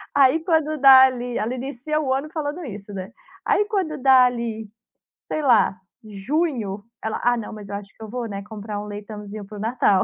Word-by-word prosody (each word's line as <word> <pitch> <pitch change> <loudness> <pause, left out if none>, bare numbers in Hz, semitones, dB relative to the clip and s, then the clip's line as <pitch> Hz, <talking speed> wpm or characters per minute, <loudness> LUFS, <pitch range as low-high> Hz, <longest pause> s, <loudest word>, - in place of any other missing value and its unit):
Aí 275 +3 +5
quando 315 -3 +1
dá 265 -1 +9
ali 245 -2 -2
ela 225 +4 -1
inicia 275 +4 -3
o 265 -3 0
ano 275 +3 -2
falando 310 +2 -4
isso, 205 -4 -8
né. 190 +2 -6 0.3
Aí, 415 - +3
quando 375 -8 -1
dá 260 -1 +6
ali, 230 -3 -3 0.6
sei 310 - -2
lá, 230 -7 +4 0.2
junho, 215 - -2 0.2
ela: 220 - -3
"Ah, 245 0 +3
não, 225 - -6
mas 210 -2 -10
eu 200 - -4
acho 200 -1 -7
que 225 - -12
eu 220 - -8
vou, 245 +1 -4
né, 200 -2 -5
comprar 210 0 -6
um 210 - -7
leitãozinho 210 0 -8
para 210 +1 -10
o 205 - -6
Natal". 215 -4 +2
235 Hz, 205 wpm, -23 LUFS, 210-275 Hz, 0.6 s, dá